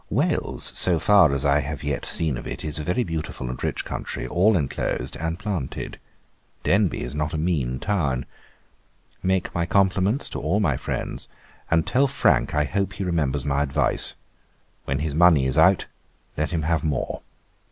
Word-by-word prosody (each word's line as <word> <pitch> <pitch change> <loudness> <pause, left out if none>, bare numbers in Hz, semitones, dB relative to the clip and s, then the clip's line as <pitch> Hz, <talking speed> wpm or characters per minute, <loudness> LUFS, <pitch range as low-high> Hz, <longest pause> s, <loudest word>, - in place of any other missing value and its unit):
'Wales, - - +1
so 90 -2 +5
far 90 -1 +5
as 70 +1 -1
I 70 +1 +4
have 75 +1 -5
yet 75 -1 -2
seen 80 -5 +1
of - - -7
it, - - -5
is 75 0 -2
a - - -3
very 90 +10 0
beautiful 80 - -4
and 65 - -7
rich - - -2
country, - - -5
all 100 +4 +3
enclosed, 70 -2 -2
and 80 +2 -3
planted. 95 - -4 0.6
Denbigh 100 -1 +2
is 60 - -6
not 75 +1 -2
a - - -1
mean 75 -7 -1
town. 70 -8 -1 1.0
Make 95 -1 0
my 85 0 -1
compliments 100 +4 +2
to - - -5
all 85 +8 0
my 105 - +2
friends, - - -4 0.4
and 80 -1 +2
tell 140 +3 +2
Frank 130 - +2
I 75 - +3
hope 95 +6 -2
he 100 - -4
remembers 75 -6 -1
my 70 -1 +1
advice. 75 +1 +1 0.7
When 70 - -1
his 75 +1 -2
money 80 -4 +5
is 65 +4 +1
out, 95 +4 +5 0.5
let 75 +1 -1
him 85 -3 -2
have 80 +1 0
more. 70 -6 -2
80 Hz, 175 wpm, -24 LUFS, 70-95 Hz, 1.0 s, so